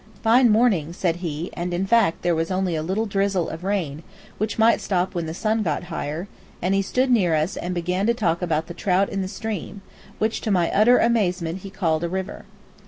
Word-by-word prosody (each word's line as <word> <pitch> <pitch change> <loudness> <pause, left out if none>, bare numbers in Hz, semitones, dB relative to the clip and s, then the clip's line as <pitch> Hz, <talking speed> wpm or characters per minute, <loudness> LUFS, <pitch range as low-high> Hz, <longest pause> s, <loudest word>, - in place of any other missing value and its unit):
"Fine 240 +2 +5
morning," 210 -8 +2
said 175 -2 -1
he, 165 -1 -4
and 175 0 -3
in 185 +2 -1
fact 210 -5 +2
there 175 - +2
was 165 0 -1
only 185 -1 0
a 155 - -1
little 190 +7 -1
drizzle 195 -3 0
of 165 +2 -7
rain, 175 -7 -2 0.4
which 215 +1 -2
might 225 +1 +4
stop 185 -1 -1
when 170 -3 -3
the 160 - -4
sun 220 +3 0
got 165 -6 -1
higher; 160 +5 -4 0.3
and 185 +2 0
he 195 - +3
stood 255 +6 0
near 185 -9 +3
us 155 +3 0
and 180 +1 -4
began 180 +4 -1
to 235 - +4
talk 175 -7 0
about 160 -3 0
the 170 - -8
trout 190 +2 +1
in 195 - -2
the 190 - -2
stream, 200 -1 -5 0.3
which, 220 +1 -1
to 220 - -3
my 180 -4 +2
utter 240 +5 +5
amazement, 185 -7 +1
he 195 - -9
called 170 -5 -1
a 170 - -1
river. 190 +2 -5
185 Hz, 220 wpm, -23 LUFS, 170-210 Hz, 0.4 s, Fine